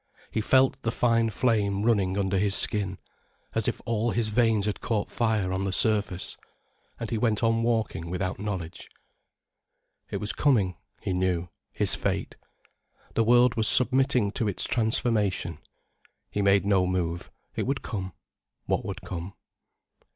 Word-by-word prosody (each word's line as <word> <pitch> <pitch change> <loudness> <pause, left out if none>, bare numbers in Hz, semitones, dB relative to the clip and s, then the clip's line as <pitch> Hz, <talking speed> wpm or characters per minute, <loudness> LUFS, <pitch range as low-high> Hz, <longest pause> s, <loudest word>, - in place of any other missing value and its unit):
He 110 - 0
felt 130 +4 +3
the 115 - -1
fine 115 -1 +2
flame 105 -2 +1
running 100 -5 +2
under 95 -1 +1
his 100 0 +1
skin, 95 -3 -1 0.6
as - - 0
if - - -2
all 115 0 0
his 115 -1 0
veins 110 -2 +2
had 105 - -2
caught 110 -3 -1
fire 110 -6 0
on 95 +1 -1
the 100 - -1
surface. 105 -2 +1 0.6
And 115 - -5
he 115 - 0
went 110 -1 +1
on 115 0 +2
walking 110 -8 -1
without 90 +1 -3
knowledge. 95 -5 -5 1.2
It - - -3
was 105 - -3
coming, 105 - +2 0.3
he 95 - -1
knew, 90 -1 0 0.3
his - - +4
fate. - - -2 0.8
The 115 - +2
world 120 +2 +5
was 110 -2 +1
submitting 125 -3 +3
to 110 - -2
its 100 - 0
transformation. 110 -7 0 0.7
He 105 - -1
made 100 0 +3
no 95 -3 +3
move: 85 -2 -2 0.3
it - - -2
would 135 0 -1
come, 95 -5 -5 0.5
what - - 0
would - - -6
come. 90 +2 -6
105 Hz, 150 wpm, -27 LUFS, 95-115 Hz, 1.2 s, world